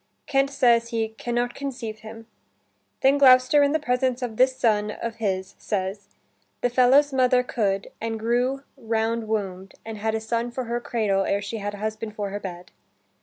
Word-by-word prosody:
Kent 275 0 +2
says 240 -4 +3
he 225 -1 -1
"can 235 +2 -5
not 240 0 0
conceive 245 -6 -6
him." 225 +1 -11 0.8
Then 275 +2 +4
Gloucester 255 +2 +6
in 285 0 +3
the 315 - +1
presence 255 -2 0
of 235 -3 -4
this 255 +2 +3
son 210 -4 +2
of 230 +2 -5
his 190 -4 -2
says: 195 0 -3 0.5
"The 245 - +1
fellow's 265 +3 +4
mother 255 -1 +3
could, 200 -5 -1
and 225 0 -3
grew 245 +4 0
round 225 -1 -1
wombed, 195 -3 -3
and 220 -1 -6
had 220 +1 -1
a - - 0
son 230 +2 -2
for 255 +2 -4
her 240 0 -2
cradle 210 -5 0
ere 200 - +1
she 205 +3 -5
had 205 0 -4
a 205 - -9
husband 215 0 -4
for 205 -2 -3
her 205 - -4
bed." 180 -3 -8
230 Hz, 185 wpm, -24 LUFS, 210-250 Hz, 0.8 s, Gloucester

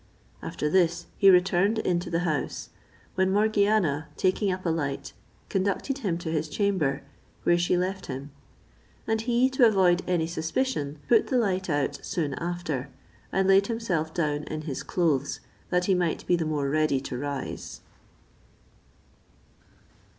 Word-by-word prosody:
After 150 - -3
this 175 +1 +2
he 195 - +7
returned 190 +3 +4
into 175 -4 0
the 170 0 0
house, 155 -5 -2 0.4
when 190 0 +1
Morgiana 205 -7 +2
taking 190 +1 +1
up 185 0 -4
a - - +2
light, 145 -4 -3 0.3
conducted 200 +8 -1
him 190 -9 -1
to 170 -2 -4
his 155 -1 -1
chamber, 160 -8 0 0.4
where 175 - +4
she 175 +1 +2
left 190 +1 -2
him; 135 +1 -6 0.7
and 220 0 0
he, 240 +2 +3
to 260 -2 +5
avoid 185 -4 +3
any 175 -3 +1
suspicion, 160 - -2
put 230 -2 +4
the 255 - +1
light 190 -5 0
out 145 -3 -1
soon 150 -5 -2
after, 170 -6 -3 0.4
and 190 0 +1
laid 195 +1 +5
himself 190 -9 -1
down 150 -3 -1
in 155 0 -5
his 150 -4 -4
clothes, 150 -6 0 0.3
that 180 0 +1
he 195 - +3
might 175 -3 0
be 180 - +3
the 170 -2 -1
more 150 -3 -1
ready 155 -1 +2
to 135 - -6
rise. 140 +1 -5
175 Hz, 150 wpm, -27 LUFS, 155-195 Hz, 0.7 s, he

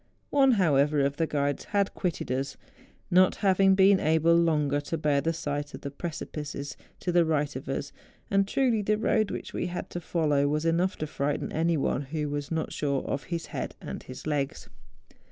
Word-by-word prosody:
One, 270 -2 +5
however, 150 -7 +3
of 140 +1 0
the 165 - +1
guides 145 -2 -1
had 200 -1 0
quitted 175 -8 -3
us, 135 +2 -2 0.5
not 185 +1 +5
having 195 -1 +4
been 195 0 +6
able 160 +1 +3
longer 150 -4 +2
to 165 +3 -3
bear 145 -2 +2
the 165 +4 0
sight 145 -2 -4
of - - -10
the 140 - -5
precipices 150 -3 -5 0.3
to 180 - -1
the 175 0 +5
right 150 -2 0
of 130 +1 -6
us; 140 +1 -3 0.4
and 195 0 +3
truly 240 -2 +2
the 210 +1 +1
road 215 -1 +1
which - - -6
we - - -2
had 175 0 -5
to 175 - -4
follow 150 -4 +1
was 150 +2 0
enough 175 +4 +2
to 155 - -3
frighten 145 -1 -2
any 165 +1 +1
one 135 - 0
who 150 +1 -3
was 145 -1 -3
not 160 -1 -2
sure 140 -2 -1
of 135 - -3
his 170 -1 -3
head - - -4
and - - -6
his 130 +1 -10
legs. 145 -3 -2
155 Hz, 195 wpm, -28 LUFS, 145-180 Hz, 0.5 s, been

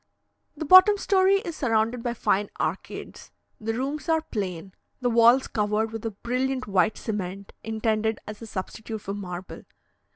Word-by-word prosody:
The 315 - -4
bottom 370 +6 +8
story 390 0 +3
is 335 -4 -6
surrounded 230 -3 0
by 240 0 -2
fine 205 -2 +1
arcades; - - -5 0.3
the 225 +1 -2
rooms 275 +4 -3
are 320 -1 +2
plain, 190 - -5 0.3
the 245 -2 0
walls 235 +3 +5
covered 215 +1 0
with 225 -1 -6
a - - -1
brilliant 255 +5 -2
white 200 +1 +2
cement, 200 -2 -5
intended 220 0 0
as 210 +1 -8
a 230 - -8
substitute 215 +2 -6
for 195 - -5
marble. 185 -2 -7
225 Hz, 155 wpm, -26 LUFS, 205-260 Hz, 0.3 s, bottom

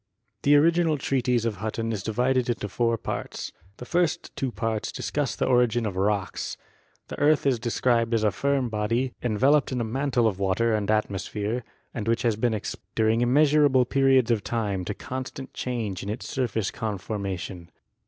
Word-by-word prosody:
The 145 +1 +5
original 165 +1 +4
treatise 125 -4 0
of 110 -3 -1
Hutton 110 +2 -3
is 105 - -3
divided 125 +4 +1
into 115 -3 -1
four 115 +3 0
parts. - - -5 0.3
The 125 - -8
first 175 +3 0
two 130 -2 -2
parts 115 -2 -2
discuss 145 -4 -2
the - - 0
origin 120 -2 +3
of 100 -3 -3
rocks. 100 0 -1 0.5
The - - -6
earth 150 +1 +3
is 130 -4 +2
described 115 0 +1
as 110 - +1
a 105 - +3
firm 140 +5 0
body, 115 +4 -1
enveloped 130 +6 +3
in 125 - -1
a - - 0
mantle 125 +1 0
of 100 -3 -2
water 100 +4 +1
and 105 -1 -1
atmosphere 105 +2 -1 0.3
and 115 -3 -4
which 115 +1 +1
has 115 -3 +2
been 110 +1 +1
ex 105 - -4
posed - - -15
during 110 +1 +2
immeasurable 140 0 +4
periods 135 -2 +3
of 110 -3 +1
time 105 -5 -2
to 105 - -3
constant 130 +1 -6
change 115 -7 -3
in 100 - -5
its 110 +4 -4
surface 115 -6 -1
conformation. 100 -4 -4
115 Hz, 175 wpm, -26 LUFS, 105-130 Hz, 0.5 s, The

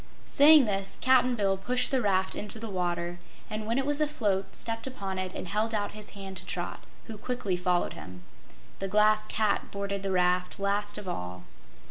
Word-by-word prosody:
Saying 295 -1 +7
this, 195 -2 -2
Cap'n 255 -1 +4
Bill 195 -3 +1
pushed 250 +6 +1
the 265 -2 +2
raft 190 -3 +1
into 210 +2 -3
the 220 -1 -6
water, 175 -1 -2 0.3
and 215 0 -3
when 230 +2 0
it 270 - +1
was 290 +1 0
afloat, 215 -11 0
stepped 225 +2 -3
upon 195 -7 -4
it 185 -1 -3
and - - -5
held 215 +4 0
out 205 -1 -1
his 215 -1 -9
hand 195 -1 -7
to - - -8
Trot, - - -4 0.3
who 220 -3 -8
quickly 230 -6 -2
followed 180 0 0
him. 90 -1 -10 0.6
The 195 - -2
Glass 215 +2 +3
Cat 215 -1 0
boarded 200 0 -3
the 195 0 -2
raft 180 0 +1
last 205 +1 0
of 210 -2 -7
all. 90 - -5
205 Hz, 190 wpm, -29 LUFS, 185-225 Hz, 0.6 s, Saying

